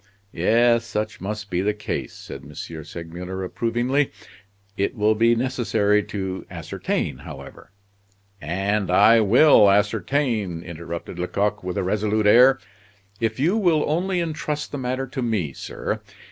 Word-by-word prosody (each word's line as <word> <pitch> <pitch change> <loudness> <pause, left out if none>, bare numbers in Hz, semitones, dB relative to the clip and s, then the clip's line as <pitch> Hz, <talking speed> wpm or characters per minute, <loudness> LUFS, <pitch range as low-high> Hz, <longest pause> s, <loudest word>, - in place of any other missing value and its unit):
"Yes, 115 +1 +3
such 110 -1 -4
must 105 +1 -5
be 90 0 0
the 105 +2 0
case," 105 - -4
said - - -9
M. - - -13
Segmuller, 85 +3 -7
approvingly. 120 +8 0 0.6
"It 100 +6 -1
will 105 -1 +3
be 115 +2 +3
necessary 110 -4 +1
to 95 -2 -4
ascertain, - - -3
however - - -11 0.4
" 100 0 -38 0.3
"And 105 -3 0
I 115 +5 +6
will 110 0 +6
ascertain," 105 - 0
interrupted 85 +1 -7
Lecoq, 100 +3 -1
with 90 -1 -4
a - - 0
resolute 105 +2 0
air, 125 +5 +7 0.6
"if 115 +1 -1
you 170 +9 +2
will 170 -8 +2
only 180 +4 0
intrust 150 -2 -3
the 145 - -4
matter 130 +1 -2
to 130 +1 -5
me, 105 - -1
sir. - - -4
105 Hz, 140 wpm, -23 LUFS, 95-125 Hz, 0.6 s, air